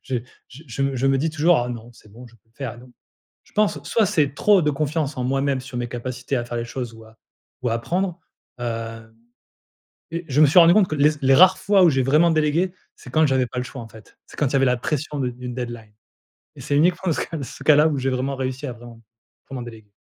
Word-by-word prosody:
je 130 - -2 0.3
je 135 +5 -13
je 130 +3 -4
me 135 0 0
je 130 +2 0
me 135 0 +2
dis 160 +3 0
toujours: 155 +2 +3
«Ah - - -5
non, 120 -1 -7
c'est 110 -2 -20
bon 125 +3 -12
je 115 - -22
peux 115 - -39
le - - -51
faire, 125 -4 -6
non». 125 +1 -15 0.5
Je - - -25
pense, 210 -1 +1
soit 225 -2 +2
c'est 145 -5 +1
trop 205 +4 +4
de 150 - +2
confiance 150 0 -2
en 125 - -2
moi-même 135 0 0
sur 130 -2 -7
mes 120 - -3
capacités 125 +2 -4
à 120 - -2
faire 120 0 -5
les 115 - -3
choses 120 -1 -5
ou 110 0 -14
à 110 0 -19 0.5
ou 125 - 0
à 115 - +1
apprendre, 180 +9 -2 0.4
hem, 115 -1 -6 1.0
et 170 +1 -4
je 145 +3 +3
me - - +9
suis 165 +5 +6
rendu 170 +1 +7
compte 200 -3 +4
que 155 - -2
les 150 +1 +4
z 150 - -10
les 135 - +5
rares 185 +4 +7
fois 200 -1 +3
où 175 - +7
j'ai 135 -3 +1
vraiment 155 +6 +4
délégué, 155 +4 +1 0.2
c'est 125 - -13
quand 155 +3 +3
j'avais 130 -2 +1
pas 120 - -9
le - - -2
choix, 130 -1 -8
en 115 - -9
fait. 110 -1 -17
C'est - - -15
quand 145 - +1
il 135 - -4
y - - +4
avait 135 - +3
la 125 -1 +2
pression 150 +3 -3
de 125 -2 0
d'une 125 0 -7
deadline, 120 -4 -6 0.7
et - - -11
c'est 145 - -1
uniquement 175 +3 +2
ce - - -2
cas 165 -3 -4
ce - - -9
cas-là, 150 0 +6
où 145 -3 -1
j'ai 130 0 -1
vraiment 130 +2 -2
réussi 130 +2 -4
à 125 - -4
vraiment 120 -1 -13 0.5
vraiment 130 -2 -5
déléguer. 110 -3 -12
135 Hz, 265 wpm, -22 LUFS, 120-155 Hz, 1.0 s, me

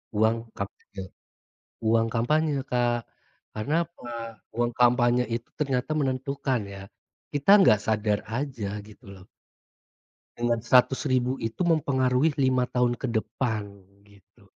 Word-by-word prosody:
Uang 115 +2 +1
kampanye 100 0 -7 0.8
uang 115 0 +3
kampanye, 150 +7 +1 0.2
Kak. 120 -1 0 0.5
Karena 110 +8 -2
apa? 125 -8 -12 0.5
Uang 120 0 +1
kampanye 120 0 +3
itu 115 0 -4
ternyata 135 -2 -1
menentukan, 135 -2 -1
ya. 100 -1 -9 0.5
Kita 145 +5 +1
nggak 105 - +5
sadar 105 -1 +1
aja, 120 -3 -3
gitu 105 0 -16
loh. 95 0 -15 1.1
Dengan 120 -1 0
RP100.000 130 +1 +3
itu 115 +11 -2
mempengaruhi 140 -3 +2
5 130 -2 +2
tahun 125 -1 +1
ke 130 - -2
depan, 110 -1 -2 0.4
gitu. 100 -2 -23
120 Hz, 115 wpm, -26 LUFS, 110-130 Hz, 1.1 s, nggak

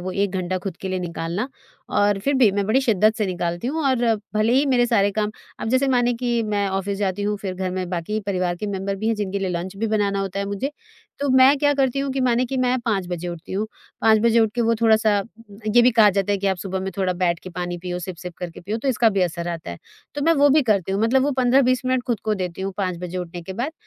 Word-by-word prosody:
वो 185 +1 -4
1 200 0 0
घंटा 185 0 -2
खुद 185 -1 -6
के 190 - -4
लिए 185 0 -1
निकालना 175 +5 -3 0.5
और 205 -1 +3
फिर 280 0 +2
भी 250 -5 +5
मैं 200 0 0
बड़ी 235 +6 +3
शिद्दत 215 -4 +3
से 215 - 0
निकालती 175 +1 -3
हूँ 315 +5 -1
और 255 -3 +2 0.3
भले 215 +2 +2
ही 275 +3 +3
मेरे 250 -3 +3
सारे 205 -4 +3
काम 210 0 -1 0.3
अब - - -3
जैसे 260 +3 +2
मानें 245 -2 +2
कि 240 -1 0
मैं 205 -1 0
ऑफ़िस 195 +1 -2
जाती 200 0 -1
हूँ 210 0 0
फिर 190 -2 -4
घर 185 0 -3
में 185 -1 -3
बाकी 180 +5 -2
परिवार 180 -3 -1
के 210 - -5
मेंबर 195 0 -3
भी 215 +3 -2
हैं, 225 - +2
जिनके 200 -2 -2
लिए 195 -1 -2
लंच 180 +2 -4
भी 225 +3 -1
बनाना 205 -2 0
होता 195 0 -3
है 200 - -1
मुझे। 200 +8 -3 0.5
तो 285 0 -1
मैं 265 +2 +7
क्या 290 +1 +3
करती 270 -1 +1
हूँ 275 0 -2
कि 270 - -2
मानें 250 0 +2
कि 265 +2 -3
मैं 255 0 +1
5 205 -6 -1
बजे 175 0 -4
उठती 170 0 -8
हूँ, 205 +3 -1 0.3
5 220 -1 +5
बजे 235 +1 +4
उठ 220 - +3
के 245 - -1
वो 230 0 +2
थोड़ा-सा 220 -2 +4
अ, 200 - -2 0.4
ये 235 +3 +5
भी 250 - +6
कहा 220 -3 +6
जाता 195 +1 0
है 200 - 0
कि 200 - -2
आप 190 -1 +1
सुबह 190 +1 -4
में 190 +1 -3
थोड़ा 185 -2 +1
बैठ 175 -1 0
के 185 - -8
पानी 175 0 -4
पियो, 180 0 -4
सिप-सिप 180 -1 -7
करके 175 -2 -7
पियो 205 +5 -3
तो 270 - -2
इसका 235 -2 +3
भी 195 -2 0
असर 170 0 -2
आता 165 - -5
है। 85 - -8 0.4
तो 290 - -3
मैं 330 +3 +4
वो 285 0 +5
भी 300 +1 +5
करती 200 -5 +1
हूँ 195 - 0
मतलब 255 +4 +3
वो 285 - +1
15-20 255 0 +3
मिनट 255 -1 +1
खुद 235 -4 -1
को 215 -1 +1
देती 180 -2 -4
हूँ 195 - -3
5 185 -3 -1
बजे 180 +1 -5
उठने 175 0 -6
के 190 - -7
बाद 245 +10 -3
205 Hz, 275 wpm, -22 LUFS, 185-240 Hz, 0.5 s, मैं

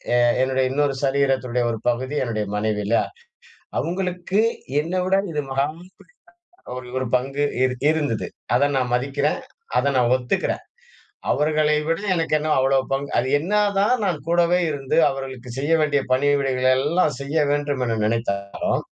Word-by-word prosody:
எ - - +4 0.2
என்னுடைய 130 0 +1
இன்னொரு 145 0 +1
சரீரத்தினுடைய 135 -3 +1
ஒரு 115 - -3
பகுதி 130 +4 -2
என்னுடைய 110 -4 -2
மனைவி 105 0 0
இல்லயா? 115 +3 +2 0.8
அவுங்களுக்கு 180 +2 -1 0.4
என்ன 170 +4 -5
விட 190 +1 +3 0.2
இது 150 -1 -1
மகா 135 +1 +1
பெரிய 180 +3 -16 0.7
ஒரு 125 -1 -9
ஒரு 130 - -2
பங்கு 135 +3 -1 0.2
இரு 130 -1 0 0.2
இருந்தது. 145 -8 -1 0.3
அத 140 +3 +3
நான் 125 -2 -1
மதிக்கிறேன். 140 +4 0 0.4
அத 140 - +2
நான் 120 -1 +3
ஒத்துக்குறேன். 130 +9 -2 0.7
அவர்களை 150 0 +2
விட 165 +2 0
எனக்கு 165 -2 0
என்ன 155 +1 -2
அவ்ளோ 135 +1 +3 0.2
பங்கு? 140 +1 -1
அது 125 - +1
என்னா 200 +8 +1 0.2
தான் 205 +5 +3
நான் 180 -5 0
கூடவே 175 +1 +3
இருந்து 140 -3 -2
அவர்களுக்கு 130 -2 -7
செய்ய 145 +4 0
வேண்டிய 145 -2 +2
பணிவிடைகள 135 -1 +2
எல்லாம் 150 0 +1
செய்ய 140 +3 -4
வேண்டும் 145 -2 0
என 115 -2 -1
நினைத்தாலும், 100 -3 -1
140 Hz, 150 wpm, -22 LUFS, 125-155 Hz, 0.8 s, எ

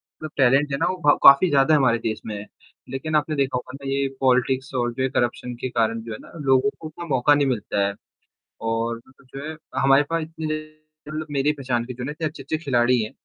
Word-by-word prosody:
मतलब 155 -1 -11
टैलेंट 135 +2 +4
है 140 - 0
ना 165 - +1
वो 185 - -1
भ - - +5
काफ़ी 140 +7 +8
ज़्यादा 145 +1 +4
हमारे 130 -5 +3
देश 110 -1 -3
में 110 -2 -4
है। 100 - -7 0.4
लेकिन 155 +4 -3
आपने 150 0 +1
देखा 135 -2 0
होगा 125 +1 -7
ना 140 0 -7
ये 140 0 0
पॉलिटिक्स 130 +1 +1
और 120 -1 0
जो 130 +2 -2
है 130 - +1
करप्शन 120 0 -1
के 130 - -2
कारण 115 -1 0
जो 115 - -8
है 110 - -6
ना - - -15
लोगों 135 +7 +4
को 160 - -7
उतना 165 +2 -9
मौका 140 -1 +3
नहीं 145 -1 +2
मिलता 105 -5 0
है। 100 - -3 0.8
और 115 +1 -1 0.3
जो 135 +1 -6
है 160 - -6 0.3
हमारे 135 +1 +5
पास 165 0 0
इतने 155 -1 -4 0.5
मतलब 155 0 -4
मेरी 145 +1 +1
पहचान 130 -5 -2
के 125 - -7
जो 125 - -7
हैं - - -3
ना 145 - -3
इतने 155 +1 -4
अच्छे-अच्छे 155 +1 -4
खिलाड़ी 125 -2 +3
हैं, 110 - -4
135 Hz, 235 wpm, -23 LUFS, 120-150 Hz, 0.8 s, काफ़ी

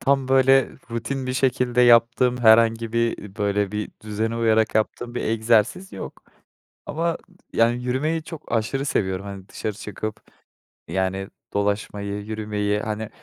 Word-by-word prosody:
tam, 135 -1 +1
böyle, 135 0 +5 0.2
rutin 125 +3 -3
bir 130 - -1
şekilde 125 -2 +1
yaptığım 120 +1 +5
herhangi 115 -1 +4
bir 115 0 +1
ııı, 100 -1 -11
böyle, 100 -1 0
bir 105 0 -3
düzene 110 +2 -2
uyarak 110 -2 +2
yaptığım 120 +2 -1
bir - - -2
egzersiz 115 - +1
yok - - -8 0.6
ama, 165 +2 -1 0.4
yani, 120 +2 +2
yürümeyi 150 +6 -1
çok, 160 -1 -10
aşırı 120 +4 0
seviyorum. 95 -9 -1
Hani, 100 -1 -8
dışarı 110 - -4
çıkıp, 105 +1 -6 0.7
yani, 95 +1 -1 0.3
dolaşmayı, 100 0 -2
yürümeyi, 105 -1 -1
hani, 110 0 -4
115 Hz, 135 wpm, -23 LUFS, 105-125 Hz, 0.7 s, böyle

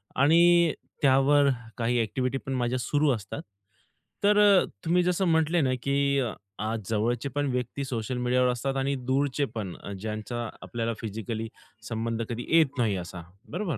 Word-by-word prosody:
आणि 170 +3 +5 0.3
त्यावर 140 +1 +5 0.3
काही 120 +1 +1
एक्टिव्हिटी 130 +4 -1
पण 135 - -3
माझ्या 125 0 0
सुरू 145 +5 +1
असतात. 100 -3 -7 0.8
तर 205 +1 +4
अ, 200 -2 +6 0.2
तुम्ही 175 +2 +3
जसं 180 +2 +1
म्हटले 160 +1 +3
ना, 130 -2 +1
की 140 0 +2 0.4
आज 110 +1 -2
जवळचे 115 +4 0
पण 145 -1 +1
व्यक्ती 125 +2 -3
सोशल 125 0 -3
मीडियावर 125 +1 +2
असतात 135 +3 -2
आणि 135 +1 0
दूरचे 140 +1 +1
पण 95 -5 -4 0.3
ज्यांचा 110 +2 -4
आपल्याला 115 -1 -3
फिजिकली 110 +1 -4 0.4
संबंध 115 0 -2
कधी 120 +1 -4
येत 155 -4 +3
नाही 110 -5 +1
असा 90 0 -7 0.3
बरोबर. 175 - -2
130 Hz, 150 wpm, -27 LUFS, 115-145 Hz, 0.8 s, अ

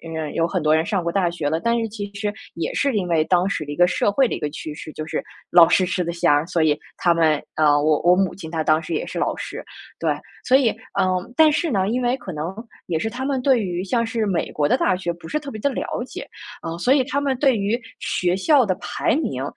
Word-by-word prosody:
呃 155 -2 -3
有 165 0 +1
很 180 -3 -2
多 155 0 +4
人 160 +1 +2
上 195 -5 -1
过 170 - -1
大 185 -3 +1
学 160 -4 -2
了， 160 +1 0
但 235 +3 +1
是 225 -1 -2
其 205 -1 -6
实 205 0 -2 0.2
也 170 - -3
是 280 -5 +1
因 180 -4 -1
为 160 -2 +2
当 180 +1 +2
时 155 - -2
的 145 - -5
一 - - -7
个 175 0 +5
社 205 - +1
会 265 +6 +3
的 - - -1
一 - - -6
个 150 - -2
趋 155 0 -6
势， 155 0 -9
就 155 - -5
是， - - -3 0.3
老 170 -2 +8
师 185 - +3
吃 180 0 -1
得 170 0 -2
香， 165 -2 +2
所 175 -3 +1
以 150 -1 +2 0.2
他 175 -1 +2
们， 160 -3 +2
呃， 150 -2 +4
我 155 -1 +3
我 175 +1 +6
母 190 -1 +1
亲 160 -4 -9
她 160 -1 -2
当 155 +1 +3
时 165 +1 -5
也 - - -1
是 - - -5
老 - - 0
师， - - -6 0.4
对。 - - +1 0.4
所 255 - +5
以， 265 -4 +5 0.3
嗯 185 +5 0
但 315 -1 +6
是 315 0 0
呢， 195 -1 +1
因 250 +2 -1
为 245 +1 +2
可 190 - -8
能 155 +4 -4 0.3
也 165 -3 -1
是 225 - -1
他 255 +3 -5
们 270 -2 -1
对 260 -2 +4
于 180 -2 -3
像 230 +3 0
是 225 -1 -1
美 175 -4 -1
国 145 -1 +1
的 - - +4
大 185 - +2
学 175 -2 -3
不 170 -1 -10
是 305 - -1
特 285 -2 -8
别 215 - -7
的 280 - +1
了 - - -2 0.2
解， - - -8 0.4
啊， 165 0 -5
所 250 +9 +3
以 275 - +3
他 280 +2 -1
们 275 -2 0
对 270 -6 +3
于 210 +5 -1 0.2
学 180 0 0
校 280 +5 +4
的 185 -4 0
排 - - -1
名 135 - -2
185 Hz, 295 characters per minute, -22 LUFS, 165-230 Hz, 0.4 s, 老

